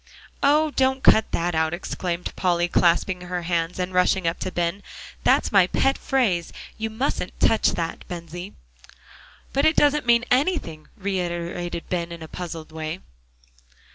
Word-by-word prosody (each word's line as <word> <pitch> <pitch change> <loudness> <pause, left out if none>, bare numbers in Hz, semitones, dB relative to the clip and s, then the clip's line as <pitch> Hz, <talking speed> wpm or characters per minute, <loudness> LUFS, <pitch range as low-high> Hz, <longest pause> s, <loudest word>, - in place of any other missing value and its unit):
"Oh! 300 +2 +4
don't 265 -1 +1
cut 220 - +5
that 175 +1 -1
out," 160 +1 +1
exclaimed 175 -1 -4
Polly, 175 -2 +1
clasping 180 +1 +2
her 180 0 -4
hands 170 0 -1
and 185 0 -3
rushing 180 0 +2
up 165 - -1
to 185 - -3
Ben. 175 +3 -1 0.4
"That's - - +3
my 195 -4 +5
pet 270 +7 +2
phrase; 200 -11 0 0.2
you 220 0 -3
mustn't 220 -4 -3
touch 225 - +3
that, 165 -1 -4
Bensie." 175 +2 -7 1.0
"But 275 +2 +2
it 315 0 +4
doesn't 290 -2 +3
mean 235 0 +4
anything," 250 - 0
reiterated 175 -3 -3
Ben 170 -1 -2
in 170 -1 -8
a - - -8
puzzled 165 -2 -7
way. 160 +2 -5
180 Hz, 150 wpm, -24 LUFS, 170-225 Hz, 1.0 s, cut